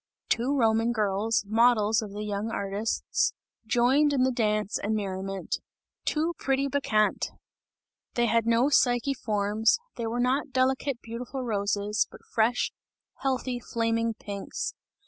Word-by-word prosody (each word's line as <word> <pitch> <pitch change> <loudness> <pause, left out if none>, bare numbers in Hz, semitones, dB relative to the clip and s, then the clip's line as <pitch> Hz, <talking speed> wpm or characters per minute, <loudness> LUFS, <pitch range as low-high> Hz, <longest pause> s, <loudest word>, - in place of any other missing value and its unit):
Two 260 +5 +1
Roman 225 -1 +3
girls, 215 0 +1
models 220 -1 +4
of 215 - -6
the 205 +1 -5
young 210 +1 -2
artists, 200 +1 -1 0.3
joined 265 +6 +3
in 260 -2 +3
the 260 - +3
dance 215 -3 0
and 215 +2 -1
merriment; 195 -2 -3 0.5
two 320 +3 0
pretty 275 0 +1
Bacchante! 215 -7 +1 0.9
They 240 - +3
had 230 0 +2
no 230 +3 +4
Psyche 250 -1 +3
forms, 215 - +1 0.2
they 230 -1 -2
were 235 +2 -2
not 260 +4 +1
delicate 260 0 0
beautiful 245 +3 -5
roses, 205 -2 0
but - - -15
fresh, 230 +2 +2 0.5
healthy 255 -2 -1
flaming 230 -1 -1
pinks. 200 -2 -5
230 Hz, 130 wpm, -27 LUFS, 210-250 Hz, 0.9 s, models